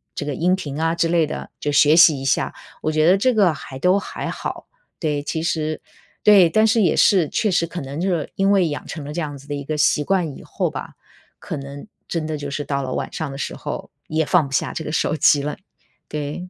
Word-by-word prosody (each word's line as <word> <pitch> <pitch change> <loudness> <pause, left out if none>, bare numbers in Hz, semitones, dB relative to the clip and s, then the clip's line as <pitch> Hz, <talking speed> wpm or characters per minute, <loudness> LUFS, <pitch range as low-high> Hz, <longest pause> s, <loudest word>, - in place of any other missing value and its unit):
这 - - -4
个 145 - -2
音 180 +6 +2
频 150 -5 -6
啊 165 +1 +1
之 170 0 +1
类 165 -2 +2
的， - - -6
就 145 - -1
学 145 +2 +5
习 165 -4 +7
一 135 - -6
下。 135 - 0 0.3
我 155 - 0
觉 155 0 +2
得 185 - +6
这 255 +6 +2
个 190 -6 +4
还 135 -2 -9
都 180 +8 +3
还 - - -5
好， - - -5 0.3
对， 150 -3 -1
其 160 +2 -3
实 155 -2 -1 0.4
对， 195 -5 +7
但 215 +5 +3
是 225 0 +3
也 175 - +3
是， 185 -6 +4
确 215 - 0
实 175 -2 +2
可 175 0 -6
能 140 +3 -6
就 190 - 0
是 170 -5 -1
因 195 +1 +2
为 190 -4 +4
养 145 - -5
成 155 - -6
了 145 +1 -7
这 170 - -2
样 145 -2 -4
子 140 +2 -16
的 145 - -3
一 140 - -5
个 155 +2 -3
习 150 0 +3
惯 170 -4 0
以 - - -12
后 - - -2
吧， - - -7 0.5
可 - - -5
能 140 +3 -8 0.2
真 165 -2 -2
的 155 -1 -3
就 145 -1 -5
是 145 - -3
到 140 -1 -2
了 130 - -4
晚 - - -3
上 155 -4 -4
的 135 - -7
时 - - -4
候， - - -6 0.2
也 160 +1 0
放 170 -1 +3
不 - - -13
下 - - 0
这 160 - -4
个 150 - -5
手 155 - 0
机 145 -2 +4
了， 150 +1 -4 0.5
对。 150 +4 -5
155 Hz, 275 characters per minute, -21 LUFS, 145-175 Hz, 0.5 s, 习